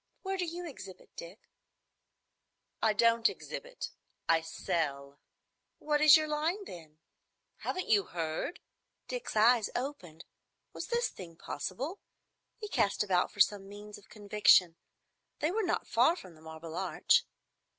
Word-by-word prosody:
Where 385 0 -2
do 365 -2 -1
you 350 +1 -5
exhibit, 195 - -11
Dick?" 170 +5 -11 1.3
"I 220 - +4
don't 230 +2 +4
exhibit. - - -7 0.4
I 165 0 +4
sell." 145 -3 -3 0.6
"What 300 0 0
is 305 +1 +9
your 310 0 -1
line, 320 +7 -1
then?" 160 - -11 0.6
"Haven't 370 - -3
you 205 -3 +4
heard?" 165 - -4 0.5
Dick's - - -5
eyes 225 +1 +5
opened. 185 - -5 0.5
Was - - -6
this 475 0 0
thing 170 -3 -11
possible? 275 - -5 0.6
He 425 - -6
cast 205 - +1
about 185 -3 +1
for 205 - -1
some 195 -1 +2
means 205 +1 -10
of 200 - -22
conviction. 205 -5 +4 0.6
They 305 - 0
were 445 +4 0
not 360 -4 -1
far 250 +9 +4
from 185 - -11
the 155 - -19
Marble 160 0 -9
Arch. - - +2
210 Hz, 140 wpm, -31 LUFS, -, 1.3 s, is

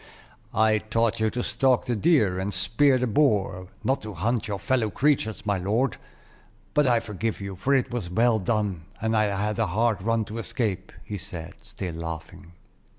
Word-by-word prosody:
"I 110 0 +4
taught 115 +1 0
you 110 0 +2
to 120 +2 -3
stalk 130 -2 +2
the 120 -2 0
deer, 110 - +3
and 95 +2 -2
spear 125 +9 +3
the 125 - 0
boar, 100 -7 +1 0.2
not 135 +1 +1
to 105 -2 -7
hunt 110 +6 0
your 100 -2 -2
fellow 120 +1 +1
creatures, 110 -2 +1
my 100 -2 +1
lord. 110 +9 0 0.8
But 150 -2 +3
I 120 -2 +4
forgive 110 0 -3
you, 100 -1 -5
for 135 +9 +1
it 130 - +1
was 115 -8 -3
well 115 +4 +3
done, 100 -4 -1
and 110 +1 0
I 110 -1 +4
had 105 +1 -1
a - - +2
hard 110 +3 +1
run 115 +2 +1
to 110 +3 -6
escape," 105 -4 -2
he 100 -2 -5
said, 85 -2 -8
still 90 -3 -6
laughing. 80 +1 -7
110 Hz, 185 wpm, -26 LUFS, 95-120 Hz, 0.8 s, I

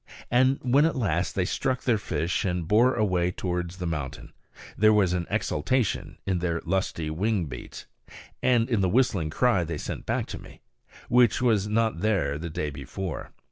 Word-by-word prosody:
And 130 +2 +4
when 135 +4 +4
at 165 - +1
last 90 - -1
they 95 - +1
struck 130 +6 -1
their 115 -4 +2
fish 85 -3 -1
and 90 -3 -2
bore 120 +7 +4
away 90 -5 +1
towards 90 -1 -3
the 90 - -4
mountain, 75 -6 -5 0.4
there 110 +1 +5
was 100 -4 +3
an 90 -2 -2
exultation 110 - -1
in 95 -2 0
their 85 -1 -1
lusty 85 -3 -1
wing 95 +2 0
beats, 60 -4 -9 0.6
and 120 -2 +3
in 115 -6 +1
the 95 - +2
whistling 100 -8 +2
cry 115 +1 +2
they 80 -1 -4
sent - - -6
back - - 0
to - - -6
me, - - -14 0.5
which 120 -3 +4
was 110 -5 +2
not 110 -4 +1
there 85 -9 0
the 85 +1 -5
day 75 -1 -3
before. 75 +5 -6
95 Hz, 180 wpm, -26 LUFS, 85-115 Hz, 0.6 s, there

